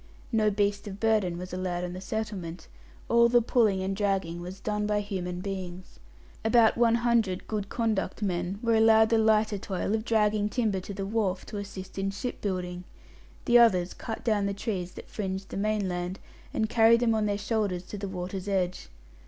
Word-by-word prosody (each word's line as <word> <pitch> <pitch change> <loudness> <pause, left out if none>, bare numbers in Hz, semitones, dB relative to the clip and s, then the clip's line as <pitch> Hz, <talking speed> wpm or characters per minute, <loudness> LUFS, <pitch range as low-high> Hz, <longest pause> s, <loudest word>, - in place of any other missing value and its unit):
No 220 -2 +3
beast 205 0 0
of 200 0 -7
burden 210 -6 +2
was 180 +1 -7
allowed 180 -1 -2
on 180 0 -4
the 185 - -7
settlement; 190 -6 -5 0.4
all 235 0 +5
the 240 0 +5
pulling 220 -5 +2
and 195 +1 -1
dragging 190 -4 -1
was 180 +2 -7
done 210 0 -1
by 210 0 +1
human 180 -3 -4
beings. 185 - -6 0.4
About 225 0 +5
one 230 -1 +4
hundred 225 -6 +2
"good 205 -2 -3
conduct" 220 -3 -1
men 180 0 -1
were 230 -1 +2
allowed 220 0 +6
the 225 -1 +3
lighter 220 -1 +3
toil 190 +1 -2
of 220 0 0
dragging 210 -2 +2
timber 215 -5 0
to 190 +2 -7
the 195 0 -3
wharf, 195 -3 -1
to 210 - -6
assist 195 -1 -7
in 195 0 0
shipbuilding; 185 -4 -4 0.6
the 240 0 +6
others 185 -7 +4
cut 225 - -6
down 210 -3 +2
the 200 - -2
trees 190 -4 -3
that - - -10
fringed 195 -2 -4
the - - -5
mainland, 190 -3 -1 0.3
and 220 - 0
carried 230 +1 +5
them 230 -2 +3
on 215 -1 +1
their 205 -1 0
shoulders 205 -4 -1
to 205 - -8
the 200 - -4
water's 185 +1 -5
edge. 185 -2 -1
200 Hz, 185 wpm, -28 LUFS, 185-220 Hz, 0.6 s, allowed